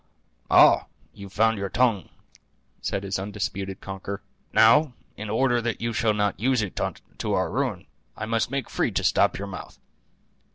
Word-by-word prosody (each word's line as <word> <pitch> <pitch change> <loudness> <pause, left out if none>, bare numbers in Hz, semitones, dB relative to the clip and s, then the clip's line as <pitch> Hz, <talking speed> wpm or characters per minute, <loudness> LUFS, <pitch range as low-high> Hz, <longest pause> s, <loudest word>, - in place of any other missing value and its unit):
"Ay, - - +6 0.3
you've 100 -1 -10
found 110 +1 +2
your 100 0 -3
tongue," 115 -6 +1 0.7
said 100 - -2
his 95 -1 -2
undisturbed 100 -1 -4
conqueror; 95 0 -6 0.3
"now, 125 +5 +5 0.2
in 105 0 -6
order 120 +2 +2
that 115 -1 -2
you 115 0 -2
shall 110 -1 +1
not 105 -1 0
use 125 0 +2
it 100 - -5 0.4
to - - -1
our - - 0
ruin, - - -2 0.3
I 110 - -3
must 115 0 0
make 135 -3 -3
free - - 0
to - - 0
stop - - +3
your 100 - -4
mouth." 100 - -9
105 Hz, 165 wpm, -25 LUFS, 100-115 Hz, 0.7 s, Ay